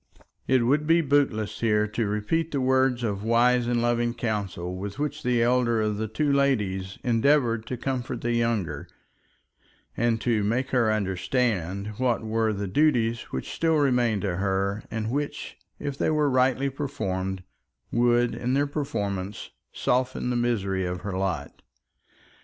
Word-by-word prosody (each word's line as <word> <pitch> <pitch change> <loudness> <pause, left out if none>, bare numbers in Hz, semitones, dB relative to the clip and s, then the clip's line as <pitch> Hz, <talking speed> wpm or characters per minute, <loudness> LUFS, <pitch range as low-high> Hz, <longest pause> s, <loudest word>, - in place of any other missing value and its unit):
It 130 -2 +3
would 150 +4 +2
be 165 +1 +5
bootless 115 -8 +1
here 105 -2 +2
to 110 0 -1
repeat 105 +11 -1
the 140 - -1
words 130 -1 +2
of 100 -3 -2
wise 120 +2 +3
and 120 -1 +1
loving 120 0 +1
counsel 100 -6 -3
with 100 +3 -6
which 150 +1 -3
the 125 -4 +2
elder 120 -1 +2
of 105 -1 0
the 110 +1 -2
two 140 +7 0
ladies 105 -9 0
endeavoured 120 -2 +2
to 125 - -3
comfort 125 -1 -3
the 120 0 0
younger, 110 -11 -1 1.1
and 115 -1 +1
to 115 -4 +1
make 125 +6 0
her 120 -4 +3
understand 100 0 -1
what 125 -3 +1
were 110 0 0
the 100 -1 -3
duties 120 -1 +2
which - - -4
still 165 -1 +1
remained 125 -8 +2
to 90 -4 -1
her, 100 +1 0
and 110 0 -3
which, 145 +2 -4 0.2
if 140 -1 -5
they - - +2
were 150 -2 +2
rightly 130 +1 +2
performed, 95 -10 -3 0.5
would, 120 0 +3
in 125 +2 -1
their 140 +1 +2
performance, 105 -10 -4 0.2
soften 125 0 0
the - - -1
misery 100 -6 0
of 90 0 -3
her 100 -2 -4
lot. 90 -6 -3
115 Hz, 155 wpm, -26 LUFS, 105-130 Hz, 1.1 s, be